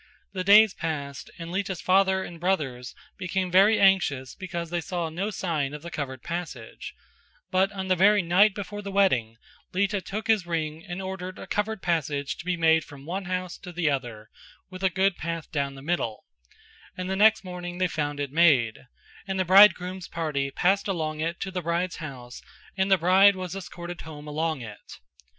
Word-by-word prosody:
The 185 -2 -2
days 210 +2 +7
passed 140 -4 -5
by - - -17
and 165 - -7
Lita's 190 -1 -2
father 190 0 +3
and 170 -2 -9
brothers 140 -9 -2 0.2
became 185 -1 -2
very 200 +4 +5
anxious 155 -10 +3
because 170 -3 -6
they 175 0 -1
saw 170 0 -3
no 185 +6 -3
sign 155 -8 -2
of 150 - -10
the 170 - -7
covered 130 -4 -5
passage; 170 0 -6 0.6
but 190 +2 +2
on 190 -2 -5
the 185 - +3
very 200 +2 +4
night 190 +4 +4
before 205 0 -6
the 200 -1 -6
wedding, 130 - +2 0.4
Lita 200 +1 0
took 215 +4 -5
his 215 -6 +2
ring 160 -1 -3
and 190 0 -6
ordered 185 -1 -6
a - - -8
covered 210 0 -2
passage 145 -5 -1
to - - -9
be 180 -1 -1
made 160 -1 +4
from 140 -1 -13
the 155 - -12
one 190 +2 -3
house 185 -1 -4
to 180 - -9
the 170 -3 0
other 120 -6 -5 0.4
with 185 +1 -9
a 190 - +4
good 190 +1 +1
path 165 0 -5
down 140 -2 -2
the 135 - -11
middle; 145 -9 -2 0.7
and 185 0 -4
the 190 - -1
next 215 +1 +5
morning 180 -1 -6
they 185 0 +2
found 145 -3 -3
it 140 -2 -3
made; 135 -8 +3 0.4
and 190 -1 -2
the 185 - +1
bridegroom's 185 -1 +5
party 150 -4 -2
passed 190 +8 +1
along 155 -5 -2
it 165 +2 -2
to 190 - -4
the 185 -1 -3
bride's 170 +1 -1
house 125 -5 -8 0.3
and 190 0 0
the 190 - +7
bride 190 +3 +5
was 185 -1 -5
escorted 175 -2 -7
home 150 -2 -10
along 155 -1 -2
it. 110 -3 -10
175 Hz, 195 wpm, -26 LUFS, 155-190 Hz, 0.7 s, days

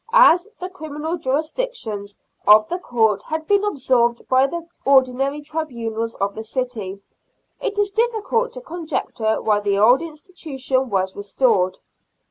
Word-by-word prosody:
As 410 -7 +6
the 365 - -4
criminal 315 -3 -5
jurisdiction 305 - -2 0.4
of 215 +1 +8
the 355 - -2
court 220 - +1
had 315 0 -4
been 405 +3 +3
absorbed 250 - +1
by 260 +1 +4
the 340 +3 -5 0.2
ordinary 270 +2 +2
tribunals 235 -8 -4
of 200 0 -1
the 220 - -6
city, 220 -5 -4 0.6
it 410 - -3
is 410 -1 +1
difficult 460 +2 0
to - - -7
con 350 -10 -8
jecture 220 -7 -1
why 210 -1 +3
the 200 -1 0
old 240 +7 +5
institution 300 -6 -3
was 190 -2 -1
restored. 200 -2 +1
270 Hz, 140 wpm, -21 LUFS, 220-345 Hz, 0.6 s, of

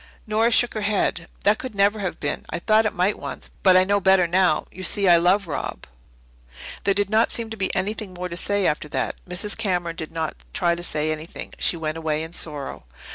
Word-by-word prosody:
Nora 220 +2 +2
shook 240 +1 +5
her 215 - -3
head. 200 -4 0 0.2
"That 210 +1 +3
could 255 -5 -6
never 200 +2 +3
have 190 -3 -3
been. 145 - -2
I - - -3
thought 215 +5 +3
it 210 - -3
might 185 +4 +1
once - - -7
but 185 -2 +6
I 185 - +6
know 200 +2 +2
better 190 -2 +4
now. 175 -2 +2
You 185 - -10
see, 195 +1 +2
I 175 -1 +7
love 180 +3 +2
Rob." 150 - -4 1.0
There 200 - +3
did 205 -1 +1
not 220 +1 +3
seem 230 -1 -3
to - - -4
be 190 -3 -1
anything 200 0 -3
more 180 +1 -4
to 170 - -7
say 205 +2 0
after 150 -1 0
that. - - -2
Mrs. 190 +4 -2
Cameron 180 -6 -1
did 160 -1 -6
not 160 -1 -3 0.2
try 175 -1 +2
to 170 - -5
say 155 -2 -1
anything. 155 +2 -7
She 175 - +3
went 160 0 -3
away 155 -1 -1
in 165 +1 -9
sorrow. 150 - -4
185 Hz, 225 wpm, -23 LUFS, 170-205 Hz, 1.0 s, I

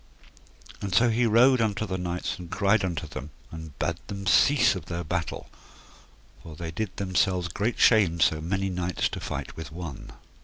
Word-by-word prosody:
And 100 -2 -2
so 120 +2 +5
he 120 +2 +2
rode 125 +3 +5
unto 110 -1 0
the 95 -2 -3
knights 90 0 -3
and 90 -2 -9
cried 100 +2 +2
unto 85 -6 -2
them, 70 - -7 0.2
and 80 -2 -9
bade 85 +2 -2
them 100 -1 -6
cease 140 +8 +5
of 90 -6 -7
their 85 0 -4
battle, 85 +1 -3 0.9
for 80 - -10
they 80 +1 -6
did 100 +2 -4
themselves 95 -2 +1
great 105 +7 -2
shame 95 -8 +4
so 80 -1 +3
many 95 +3 -1
knights 90 -2 -1
to - - -6
fight - - -5
with 80 -3 -8
one. 85 -5 -8
90 Hz, 180 wpm, -26 LUFS, 85-105 Hz, 0.9 s, so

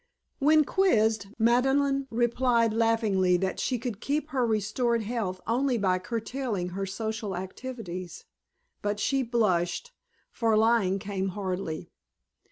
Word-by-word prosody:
When 305 +1 +5
quizzed, 220 - +2
Madeleine 270 +4 +2
replied 235 -1 +2
laughingly 215 -5 +2
that 190 +1 -2
she 255 - 0
could 230 -3 -5
keep 300 +2 -1
her 260 -5 +1
restored 225 +2 0
health 205 -5 -3
only 250 +2 +1
by 185 -3 +1
curtailing 225 -2 -3
her 195 +2 -4
social 215 0 -3
activities; 185 -3 -7 0.6
but 205 0 -2
she 270 +6 +1
blushed, 225 - 0 0.4
for 225 -3 +1
lying 220 -4 +3
came 195 -1 -3
hardly. 185 -5 -4
225 Hz, 120 wpm, -28 LUFS, 195-250 Hz, 0.6 s, When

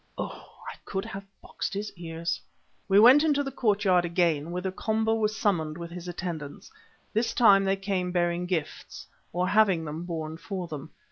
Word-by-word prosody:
Oh! - - -6 0.3
I - - -17
could 195 0 -4
have 195 0 -7 0.2
boxed - - -4
his 205 +1 -4
ears. 165 -1 -4 0.5
We 195 0 +5
went 255 +7 +8
into 290 -2 +2
the 275 - -4
courtyard 205 -7 +2
again, 170 -3 +1
whither 180 +2 -3
Komba 220 +3 0
was 215 -1 0
summoned 160 -8 0
with 170 -1 -7
his 180 0 -8
attendants. 170 -5 -6 0.4
This 225 +2 0
time 195 -4 +6
they 195 0 +2
came 195 -2 -2
bearing 175 0 0
gifts, 165 -5 -4 0.3
or 180 +1 0
having 195 -5 +3
them 155 +3 -5
borne 160 -2 -4
for 185 0 -5
them. 155 -1 -7
180 Hz, 175 wpm, -27 LUFS, 170-205 Hz, 0.5 s, went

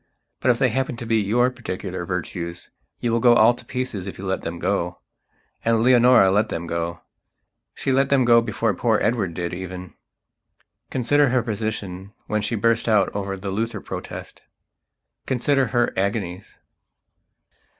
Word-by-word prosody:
But - - +1
if 120 - +4
they 130 +1 +3
happen 130 +1 -2
to 115 - -6
be 115 0 +2
your 120 +5 +2
particular 95 -7 -5
virtues 85 -1 -5 0.3
you 120 - 0
will 115 - +2
go 120 0 +6
all 115 +1 +6
to - - -11
pieces 125 -7 -4
if 100 - -7
you 100 - -7
let 95 0 -1
them 85 +1 -5
go. 90 -1 -1 0.6
And 115 -1 +2
Leonora 125 -5 +6
let 105 +3 +2
them 85 - -4
go. 85 0 -3 0.7
She 135 - -1
let 135 +1 +2
them 135 -3 +3
go 115 -1 +6
before 115 -1 -1
poor 110 +3 +1
Edward 105 -7 0
did 85 0 -3
even. 90 0 -7 1.0
Consider 140 +3 +2
her 125 -1 +1
position 105 -3 -4
when 105 0 -1
she 110 +3 -1
burst 115 +2 +1
out 105 -3 +2
over 100 -1 -3
the 95 0 -5
Luther 110 +2 -2
Protest.... - - -8 0.9
Consider 135 +1 +2
her 120 +2 +1
agonies.... 95 -1 -3
110 Hz, 160 wpm, -23 LUFS, 95-120 Hz, 1.0 s, go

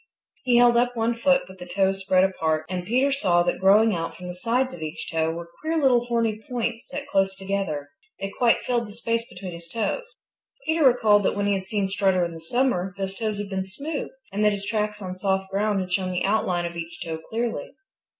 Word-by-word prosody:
He 245 -2 +4
held 240 0 +6
up 245 0 +1
one 230 +1 +2
foot 270 +3 +2
with 190 0 -13
the 180 - -8
toes 195 +1 +1
spread 190 -1 +3
apart 160 -5 0
and 180 0 -4
Peter 260 +5 +3
saw 175 -11 +3
that 175 - -1
growing 205 +4 +5
out 165 -1 -3
from 180 - -8
the 180 - -4
sides 240 +7 0
of 175 - -9
each 155 +1 -5
toe 160 -1 +1
were 170 +1 -6
queer 320 +1 0
little 250 -4 +4
horny 230 -2 0
points 235 -1 -3
set 285 0 -5
close 195 -1 +1
together. 190 -7 -3 0.3
They 195 0 -4
quite 240 -2 +3
filled 240 -2 0
the 205 - -10
space 230 +1 -2
between 180 0 -7
his 170 0 -10
toes. 230 - -3 0.5
Peter 320 0 +2
recalled 225 -6 +5
that - - +1
when 205 0 0
he 205 - +2
had 190 -1 -3
seen 200 -1 0
Strutter 190 -2 +2
in 170 - -5
the 165 - -8
summer 195 -1 0
those 195 -1 -3
toes 215 0 -2
had 205 -1 -5
been 190 0 -1
smooth 280 +11 -5 0.2
and 205 +2 0
that 210 0 +4
his 200 -1 -4
tracks 210 -1 -2
on 185 0 -6
soft 190 0 0
ground 205 +1 +1
had 185 -1 -3
shown 185 -1 0
the 180 - -1
outline 185 -4 +1
of 170 0 -5
each 170 0 -6
toe 160 -1 -4
clearly. 235 +3 -3
200 Hz, 230 wpm, -25 LUFS, 185-235 Hz, 0.5 s, held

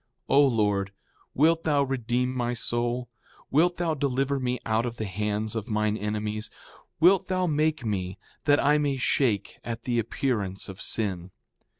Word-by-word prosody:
4:31 - - +2
O 140 0 +7
Lord, 105 -5 +1 0.4
wilt 165 +4 +4
thou 145 -3 +3
redeem 125 -1 -1
my 120 -1 -1
soul? 120 +1 -1 0.4
Wilt 175 +5 +3
thou 170 -2 0
deliver 140 -1 0
me 125 -1 -1
out 110 +1 +1
of 120 -1 -4
the 110 - -3
hands 105 +2 -2
of 110 -2 -3
mine 110 -1 +1
enemies? 105 +1 -2 0.5
Wilt 180 +3 +5
thou 185 -1 +1
make 155 -3 +1
me 95 -3 -2 0.3
that 145 -1 +5
I 150 +1 +4
may 145 -2 0
shake 125 -5 0
at 115 0 -5
the 120 -2 0
appearance 110 -4 -2
of 95 +1 -9
sin? 95 -5 -2
120 Hz, 165 wpm, -27 LUFS, 105-140 Hz, 0.5 s, O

